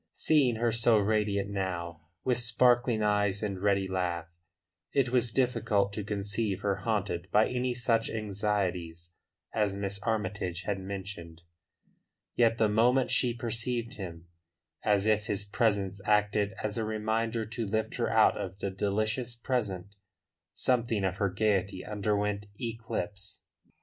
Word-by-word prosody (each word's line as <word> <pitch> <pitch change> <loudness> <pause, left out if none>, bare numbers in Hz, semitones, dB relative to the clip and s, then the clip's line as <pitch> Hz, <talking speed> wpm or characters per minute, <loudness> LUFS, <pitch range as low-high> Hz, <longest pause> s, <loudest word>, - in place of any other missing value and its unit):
Seeing 140 -7 +3
her 115 +1 +1
so 115 0 +4
radiant 100 -1 +1
now, 85 -4 -3 0.2
with 125 -1 +2
sparkling 120 -1 +3
eyes 105 -1 +1
and 100 -3 -3
ready 100 -1 +2
laugh, 90 -3 -1 0.7
it 135 -3 +2
was 120 -2 +2
difficult 105 -6 +1
to 105 - -3
conceive 100 0 -2
her 100 -2 0
haunted 100 -4 -2
by 110 +1 +4
any 125 0 -1
such 115 -2 +1
anxieties 95 -5 -2 0.4
as 105 -3 +1
Miss 100 0 -3
Armytage 100 -5 -2
had 100 +1 -2
mentioned. 95 -4 -7 0.9
Yet 115 -1 +3
the 110 - +4
moment 120 +5 +3
she 125 - +3
perceived 115 0 -2
him, 85 -4 -7 0.6
as 105 -1 +2
if 105 -1 +2
his 105 -2 -1
presence 100 -2 0
acted 105 -1 +2
as 110 +1 -1
a - - 0
reminder 110 +1 -1
to 115 0 -4
lift 110 +2 -1
her - - 0
out - - +5
of 95 0 -5
the 100 -1 -3
delicious 110 +5 -1
present, 100 -6 -2 0.6
something 115 -5 +1
of 95 0 0
her 100 -1 +1
gaiety 100 -1 0
underwent 105 0 -1
eclipse. 105 -4 -5
105 Hz, 140 wpm, -30 LUFS, 100-115 Hz, 0.9 s, out